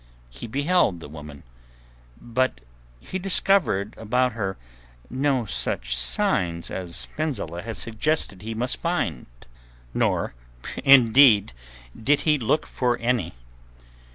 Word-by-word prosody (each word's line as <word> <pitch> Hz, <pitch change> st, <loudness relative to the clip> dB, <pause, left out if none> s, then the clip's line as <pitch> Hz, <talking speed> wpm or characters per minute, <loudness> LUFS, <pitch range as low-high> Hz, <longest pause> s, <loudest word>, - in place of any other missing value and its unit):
He 65 Hz, -, -8 dB
beheld 140 Hz, -, +2 dB
the 80 Hz, -, -9 dB
woman, 75 Hz, -1 st, -10 dB, 0.8 s
but 120 Hz, -, -1 dB, 0.4 s
he 185 Hz, -, -5 dB
discovered 180 Hz, -, +1 dB
about 125 Hz, +3 st, +1 dB
her 100 Hz, -4 st, -3 dB, 0.5 s
no 130 Hz, -1 st, +1 dB
such 60 Hz, -, -3 dB
signs 85 Hz, +8 st, -1 dB
as 90 Hz, -2 st, -6 dB
Fenzileh 130 Hz, -, -3 dB
had 115 Hz, +2 st, -6 dB
suggested 115 Hz, -2 st, -2 dB
he 110 Hz, +2 st, -5 dB
must 125 Hz, +3 st, -2 dB
find, -, -, -2 dB, 0.7 s
nor -, -, 0 dB, 0.5 s
indeed 125 Hz, -, +7 dB, 0.4 s
did 145 Hz, +6 st, +2 dB
he 150 Hz, -2 st, +2 dB
look 140 Hz, +6 st, +1 dB
for 125 Hz, -1 st, 0 dB
any. 115 Hz, -, -1 dB
115 Hz, 110 wpm, -24 LUFS, 90-135 Hz, 0.8 s, indeed